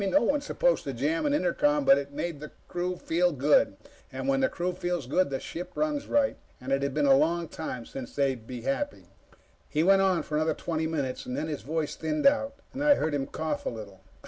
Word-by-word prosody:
No 235 Hz, +9 st, +3 dB
one's 285 Hz, +5 st, +1 dB
supposed -, -, +1 dB
to 135 Hz, -, -3 dB
jam 150 Hz, -, 0 dB
an 290 Hz, -, +1 dB
intercom, 295 Hz, -1 st, +2 dB
but 275 Hz, 0 st, +7 dB
it 140 Hz, 0 st, -6 dB
made 160 Hz, +1 st, -4 dB
the 150 Hz, +1 st, -8 dB, 0.2 s
crew 180 Hz, +1 st, -2 dB
feel 175 Hz, +2 st, +1 dB
good. 145 Hz, 0 st, +3 dB, 0.3 s
When 275 Hz, 0 st, 0 dB
the 265 Hz, -, +3 dB
crew 180 Hz, 0 st, -2 dB
feels 175 Hz, -4 st, -2 dB
good, 175 Hz, +6 st, +2 dB
the 135 Hz, -1 st, -2 dB
ship 180 Hz, +2 st, -7 dB
runs 300 Hz, -2 st, -1 dB
right, 285 Hz, -1 st, +2 dB, 0.2 s
and 130 Hz, +2 st, -6 dB
it 135 Hz, 0 st, +2 dB
had 140 Hz, 0 st, -2 dB
been 150 Hz, -1 st, +2 dB
a 135 Hz, -1 st, +7 dB
long 165 Hz, +4 st, +2 dB
time 130 Hz, -7 st, -6 dB
since 130 Hz, -3 st, -8 dB
they'd 130 Hz, -5 st, 0 dB
been 125 Hz, -2 st, -6 dB
happy. 290 Hz, -, -2 dB, 0.6 s
He 155 Hz, +1 st, +1 dB
went 195 Hz, +2 st, +5 dB
on 190 Hz, -3 st, +2 dB
for 150 Hz, -, -2 dB
another 155 Hz, +1 st, +1 dB
twenty 160 Hz, -1 st, -2 dB
minutes. 140 Hz, -5 st, -3 dB
Then 125 Hz, +5 st, -3 dB
his 150 Hz, -3 st, -4 dB
voice 155 Hz, +1 st, -2 dB
thinned 155 Hz, -, -2 dB
out, 275 Hz, 0 st, +3 dB, 0.2 s
and 275 Hz, +2 st, -3 dB
I 295 Hz, -1 st, +6 dB
heard 155 Hz, -, -1 dB
him 135 Hz, -2 st, -1 dB
cough 155 Hz, -1 st, -3 dB
a -, -, +2 dB
little. 100 Hz, -4 st, -9 dB
160 Hz, 225 wpm, -28 LUFS, 140-195 Hz, 0.6 s, but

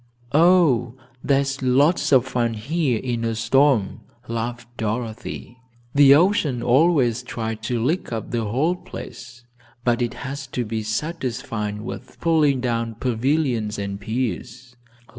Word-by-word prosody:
"Oh, 150 Hz, -8 st, +4 dB, 0.3 s
there's 135 Hz, -1 st, +1 dB
lots 140 Hz, +7 st, +3 dB
of 130 Hz, -2 st, +5 dB
fun 120 Hz, -3 st, -1 dB
here 135 Hz, +2 st, 0 dB
in 120 Hz, 0 st, -3 dB
a 115 Hz, -1 st, -1 dB
storm," 115 Hz, -1 st, +2 dB, 0.3 s
laughed 115 Hz, +1 st, -4 dB
Dorothy. 115 Hz, +2 st, -5 dB, 0.3 s
"The 140 Hz, -1 st, +7 dB
ocean 155 Hz, -8 st, +2 dB
always 130 Hz, -2 st, +3 dB
tries 110 Hz, -3 st, -4 dB
to 120 Hz, -2 st, -1 dB
lick 150 Hz, +9 st, -1 dB
up 115 Hz, -1 st, -4 dB
the 115 Hz, -2 st, -1 dB
whole 140 Hz, +12 st, +1 dB
place, 120 Hz, -8 st, -10 dB, 0.4 s
but 120 Hz, 0 st, +1 dB
it 120 Hz, -, -1 dB
has 140 Hz, 0 st, -6 dB
to 120 Hz, -, 0 dB
be 110 Hz, 0 st, -3 dB
satisfied 110 Hz, -4 st, -3 dB
with 115 Hz, -, -8 dB
pulling 150 Hz, -5 st, +2 dB
down 115 Hz, -2 st, -1 dB
pavilions 120 Hz, -2 st, 0 dB
and 100 Hz, -1 st, -4 dB
piers. 125 Hz, +2 st, -4 dB
125 Hz, 130 wpm, -22 LUFS, 115-140 Hz, 0.4 s, The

